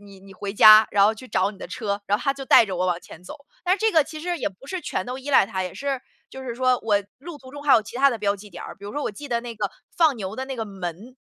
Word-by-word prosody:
你 200 -2 -15
你 195 0 -14
回 200 +1 -5
家， 215 +1 +9
然 200 -1 +4
后 215 +2 +3
去 255 +4 -12
找 190 -1 +1
你 205 - -15
的 - - -7
车。” 205 -3 -3
然 205 - +2
后 - - -8
它 275 - +1
就 270 - -7
带 235 - +7
着 190 -2 -4
我 180 +1 0
往 175 -1 -1
前 170 - -14
走。 - - -8 0.3
但 360 - +3
是 395 - -7
这 445 - +3
个 315 -3 +5
其 310 +1 -9
实 350 +1 -2
也 255 - -1
不 195 +8 -18
是 370 +5 -4
全 - - -3
都 250 +1 -5
依 270 +2 -6
赖 265 - +5
它， 190 -3 -3
也 180 - -6
是 275 -2 -3 0.3
就 265 - -9
是 245 -2 -5
说 255 0 +2
我 205 -2 +2 0.2
路 310 +4 -9
途 260 -2 -14
中 290 +1 -9
还 290 - +4
有 225 - +4
其 220 +3 -9
它 275 +2 +5
的 235 - -4
标 205 -1 0
记 205 +1 -13
点 - - -9
儿， - - -8
比 200 - -14
如 205 - -7
说 295 - -3
我 - - -2
记 285 +8 -10
得 235 -1 0
那 235 -1 -7
个 - - -3 0.3
放 315 -6 +4
牛 200 -1 -6
的 260 - -3
那 270 - -5
个 225 - -3
门。 195 +4 -7
225 Hz, 355 characters per minute, -24 LUFS, 200-270 Hz, 0.3 s, 家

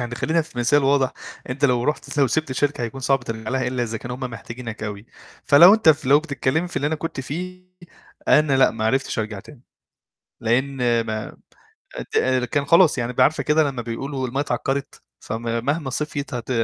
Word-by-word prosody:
يعني 120 0 -4
خلّينا 160 +6 0
في 130 -5 -12
مثال 140 +4 +3
واضح، 135 -2 +2 0.4
أنت 140 +3 -2
لو 125 -2 +2
رُحت 150 0 -3
لو 135 - +5
سِبت 155 +5 -1
الشركة 140 0 -1
هيكون 120 +3 -5
صعب 135 0 +2
ترجع 110 0 -5
لها 130 -1 -1
إلّا 125 0 -1
إذا 115 -1 -3
كانوا 125 +1 -6
هُم 130 - -14
محتاجينك 115 -2 -7
أوي، 105 +1 -6 0.4
فلو 170 +8 +8
أنت 220 -7 +2
فلو 145 -2 +5
بتتكلّمي 160 +2 -1
في - - -10
اللي 145 - 0
أنا 160 - 0
كنت 155 -3 -5
فيه، 180 +7 -6 0.7
أنا 150 -2 +4
لأ 130 - +5
ما 110 -1 -4
عرفتش 135 +2 0
أرجع 105 -2 -3
تاني، 135 0 -16 0.8
لإن 120 0 +1
ما 110 -1 -5 0.8
ت - - +3 0.3
كان 145 -2 0
خلاص 165 -1 +5
يعني 120 +1 -2
ب 125 - -2
عارفة 150 +5 +3
كده 155 +1 +3
لمّا 125 -3 -5
بيقولوا 130 +3 -4
المَيّه 130 +3 -4
ااتعكّرت 140 -1 -3 0.2
فم 115 +2 -5 0.2
مهما 145 -1 -1
صفْيت 145 -1 -4
هت 120 0 -5
135 Hz, 190 wpm, -22 LUFS, 120-145 Hz, 0.8 s, فلو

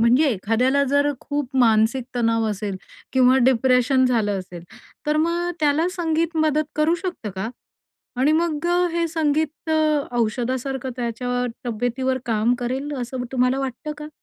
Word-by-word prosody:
म्हणजे 250 +6 +4
एखाद्याला 245 +7 +1
जर 285 +1 +3
खूप 285 -3 -3
मानसिक 230 +1 +3
तणाव 230 -1 +1
असेल 200 -1 -4 0.4
किंवा 255 0 +5
डिप्रेशन 260 +1 +3
झालं 210 -5 +1
असेल, 180 -2 -9 0.4
तर 300 - +2
मग 340 +2 0
त्याला 300 +4 +2
संगीत 330 -1 0
मदत 310 -1 +2
करू 310 +2 +3
शकतं 350 - -4
का? 210 +4 -2 0.7
आणि 280 +4 +4
मग 320 -1 0 0.3
हे 335 0 0
संगीत 315 -1 -1
अ, 315 - +2 0.4
औषधासारखं 255 +3 -1
त्याच्या 245 +1 -2 0.2
तब्येतीवर 245 +3 -1
काम 225 0 +2
करेल, 260 +4 -3
असं 250 +1 -4
तुम्हाला 255 +1 +1
वाटतं 270 +3 -4
का? 300 0 -8
260 Hz, 140 wpm, -22 LUFS, 235-300 Hz, 0.7 s, किंवा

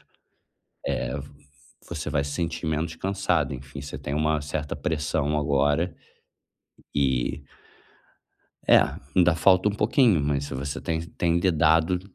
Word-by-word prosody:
eh, - - -29 1.9
vo - - -4
você 75 0 -4
vai 70 -1 +1
se 70 - -5
sentir 85 0 -3
menos 80 +1 -1
cansado, 95 -4 0
enfim, 65 +2 -8
você 70 - -7
tem 70 - -5
uma 75 0 +1
certa 75 0 -3
pressão 75 -1 -1
agora 75 +4 +1 1.0
e 70 0 0 1.2
É, - - +8 0.4
ainda 90 -3 +5
falta 95 +4 +4
um - - -1
pouquinho, 110 - +3
mas 70 -1 0
se 70 - -6
você 70 +2 -4
tem 80 0 -2
tem 85 0 0
lidado, 80 0 +3
80 Hz, 135 wpm, -25 LUFS, 70-85 Hz, 1.9 s, É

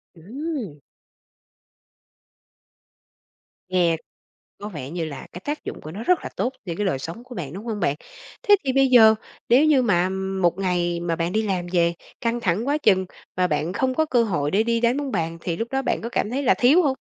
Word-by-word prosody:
Ừm! 225 - -6 2.9
Nghe 175 -3 +2 0.6
có 205 - -6
vẻ 145 -8 -7
như 170 0 -3
là 145 -3 -7
cái 180 - -9
tác 295 +1 -3
dụng - - -6
của 155 - -8
nó 210 +6 -6
rất 360 +4 +3
là - - -5
tốt 255 +2 -1
cho 170 - -3
cái 210 - -1
đời 155 -8 0
sống 170 - -7
của 250 -2 -11
bạn, 150 -4 -5
đúng 205 +5 -8
hông 220 -3 -3
bạn? 140 - +1 0.5
Thế 410 - +8
thì 260 -2 0
bây 270 0 +4
giờ, 220 -3 +7 0.3
nếu 265 +6 +6
như 290 -4 +5
mà 185 -5 +2 0.3
một 175 +1 +2
ngày 175 -2 0
mà 170 -1 -1
bạn 170 +1 -1
đi 220 - +2
làm 185 -4 -2
về, 170 -1 +2 0.3
căng 235 0 0
thẳng 210 +4 0
quá 290 +1 +2
chừng, 190 -9 +3 0.3
mà 180 - +3
bạn 155 +2 -1
không 260 +2 0
có 315 - +2
cơ 245 -5 +2
hội 150 -9 -1
để 215 +3 +3
đi 230 0 +1
đánh 240 +3 +2
bóng 285 -2 -3
bàn 165 -3 -2
thì 170 -2 -3
lúc 230 - -2
đó 270 0 0
bạn - - -1
có 230 - -4
cảm 210 - -1
thấy 275 +3 -2
là 255 - +5
thiếu 285 +9 +5
hông? 270 -3 +1
205 Hz, 220 wpm, -23 LUFS, 170-255 Hz, 2.9 s, Thế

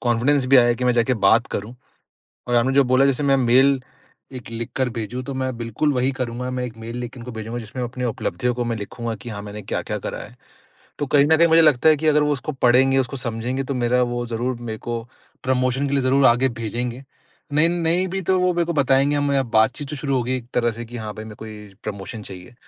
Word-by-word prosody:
Confidence 125 +3 +2
भी 135 - +9
आया 120 -1 +6
कि 125 - -4
मैं 125 - +3
जाके 120 +2 +2
बात 115 +4 +5
करूँ। 105 +5 -4 0.7
और 120 - +1
आपने 130 +3 +3
जो 140 -1 +5
बोला 130 +2 +3
जैसे 140 +1 +1
मैं 140 -1 +3
मेल 130 +2 +4 0.5
एक 125 -2 -8
लिख 115 0 -5
कर 130 -1 +1
भेजूँ, 115 +2 -5
तो 135 +1 -6
मैं 130 -2 -2
बिल्कुल 115 +6 -1
वही 130 +1 +1
करूँगा। 125 -1 -4
मैं 125 0 -3
एक 115 -3 -7
मेल 115 +2 -7
लिख 120 -1 -5
के 130 - -12
उनको 125 +1 -8
भेजूँगा, 110 +2 -5
जिसमें 120 +3 -6
मैं 120 - -2
अपनी 125 0 -5
उपलब्धियों 125 +1 -2
को 125 - -2
मैं 120 -1 -2
लिखूँगा 115 +2 -5
कि - - -8
हाँ 100 -1 -6
मैंने 105 0 -8
क्या-क्या - - -3
करा - - -5
है। - - -13 0.6
तो 145 - -1
कहीं 140 +1 +4
न 160 +1 +5
कहीं 170 +1 +5
मुझे 165 0 +6
लगता 150 -1 +4
है 155 - +6
कि 155 +2 -3
अगर 150 0 +4
वो 150 0 +1
उसको 140 +2 -3
पढ़ेंगे, 135 +1 +4
उसको 135 +1 -1
समझेंगे, 125 +2 -3
तो 135 0 -3
मेरा 125 0 +2
वो 120 0 -1
ज़रूर 120 +2 -2
मेरे 110 -2 -5
को 120 -1 -4 0.4
प्रमोशन 130 +2 0
के 140 - -4
लिए 140 - +2
ज़रूर 130 +1 +4
आगे 120 +3 +4
भेजेंगे। 120 +3 -4 0.5
नहीं 150 +3 +4
नहीं 175 +2 0
भी 190 +1 -3
तो 185 - +4
वो 180 0 +2
मेरे 170 - +1
को 170 - -1
बताएँगे, 140 0 +2
हम 140 -1 +1
बातचीत 125 +7 +2
तो 150 - -4
शुरू 135 -1 -1
होगी 125 +1 0
एक 120 -2 -7
तरह 120 -1 +2
से 120 +1 -7
कि 120 +2 -9
हाँ 110 -2 -5
भाई 110 - -8
मेरे 110 -1 -9
को 110 - -9
ये 105 -2 -10
प्रमोशन 105 +1 -6
चाहिए। 95 +3 -11
125 Hz, 250 wpm, -22 LUFS, 115-135 Hz, 0.7 s, भी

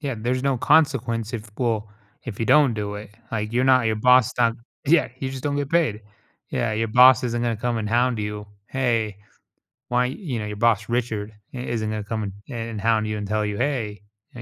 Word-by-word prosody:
Yeah, 140 -4 -3
there's 125 +3 -1
no 135 -2 +1
consequence 115 -6 +2
if 105 -2 -6
well, 110 -4 -1 0.4
if 115 -2 -7
you 115 - 0
don't 145 -6 +5
do 105 -1 -4
it, 105 0 -8 0.2
like, 105 0 -2
you're 125 +2 +2
not 130 -3 +4
your 110 -1 +1
boss 125 +1 +5
don 115 -1 +2 0.3
yeah, 160 +3 +4
you 130 - -3
just 130 -1 -7
don't 145 -1 0
get 145 -1 -2
paid. 155 -11 +1 0.5
Yeah, 120 -2 -1
your 110 +1 -1
boss 125 +2 +7
isn't 120 0 -1
gonna 115 -2 0
come 120 0 -1
and 105 -1 -3
hound 120 0 +2
you, 105 0 -4 0.2
"Hey, 115 -6 -1 0.7
why" 125 0 +2 0.2
you 120 - -1
know, 105 - -4
your 105 - -5
boss, 110 -2 +2
Richard, 110 -3 -2 0.2
i - - -6
isn't 115 -3 -2
gonna 110 -1 -3
come 110 +1 -3
and 100 - -5 0.2
and 115 -2 -4
and 105 -3 -5
hound 110 -1 +2
you 105 0 -2
and 105 -1 -4
tell 105 0 0
you, 105 -1 -3
"Hey," 115 -7 -2 0.3
you 120 - -9
115 Hz, 220 wpm, -23 LUFS, 105-125 Hz, 0.7 s, boss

